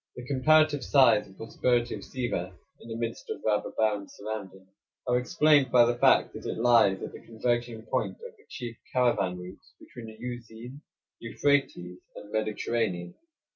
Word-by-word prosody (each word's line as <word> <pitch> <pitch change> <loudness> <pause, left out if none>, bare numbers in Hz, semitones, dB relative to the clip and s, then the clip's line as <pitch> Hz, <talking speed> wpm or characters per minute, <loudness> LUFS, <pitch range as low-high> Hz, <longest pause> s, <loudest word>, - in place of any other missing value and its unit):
The 125 - -8
comparative 145 +2 +3
size 130 -6 +4
and 95 - -18
prosperity 120 +1 0
of - - -6
Sivas, 95 -8 -4 0.3
in - - -13
the 115 - -5
midst 115 0 -5
of - - -4
rather 105 -1 +1
barren 105 -2 0
surroundings, 100 -3 -8 0.4
are 125 0 +2
explained 145 +1 +3
by 120 -1 +6
the 120 0 +1
fact - - +4
that - - -8
it - - -3
lies 115 -5 +4
at - - -6
the - - -11
converging 120 0 -2
point 110 - -2
of 470 0 -12
the 425 - -25
chief 120 -2 -7
caravan 105 -8 +1
routes 90 +1 -12
between 120 -2 -11
the 110 0 -11
Euxine, 120 +2 -8 0.4
Euphrates, 115 -8 -1 0.2
and 105 - -11
Mediterranean. 110 -4 -2
115 Hz, 165 wpm, -28 LUFS, 105-125 Hz, 0.4 s, by